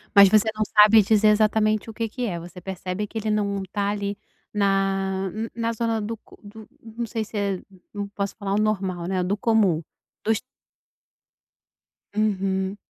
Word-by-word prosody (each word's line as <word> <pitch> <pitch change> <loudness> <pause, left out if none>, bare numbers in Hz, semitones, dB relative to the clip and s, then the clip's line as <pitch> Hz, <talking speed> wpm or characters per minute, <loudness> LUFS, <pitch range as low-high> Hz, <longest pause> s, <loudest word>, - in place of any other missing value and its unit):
Mas 200 -1 +9
você 215 +2 +4
não 215 - +1
sabe 215 +1 +7
dizer 215 +1 +3
exatamente 215 0 +2
o - - -7
que 225 0 -3
que 250 +2 -3
é, 175 -6 -3
você 175 +1 -10
percebe 190 +2 -4
que 225 - -7
ele 220 0 -2
não 200 -2 0
tá 200 -1 0
ali 205 0 -2 0.4
na, 195 -1 +1
n 225 +1 -4
na 230 0 -1
zona 225 -1 -1
do 225 +2 -4
co - - -19
do 210 +1 -12
não 230 +1 -5
sei 225 -1 -3
se 210 0 -7
é 200 -2 -1 0.3
não 205 -1 -4
posso 200 0 -4
falar 200 -2 -3
o - - +2
normal, 190 -5 -1
né. 185 -1 0
Do 200 +3 -1
comum, 205 -7 +2 0.4
dos 220 0 +1 1.8
Uhum. 195 -2 0
205 Hz, 175 wpm, -24 LUFS, 195-220 Hz, 1.8 s, Mas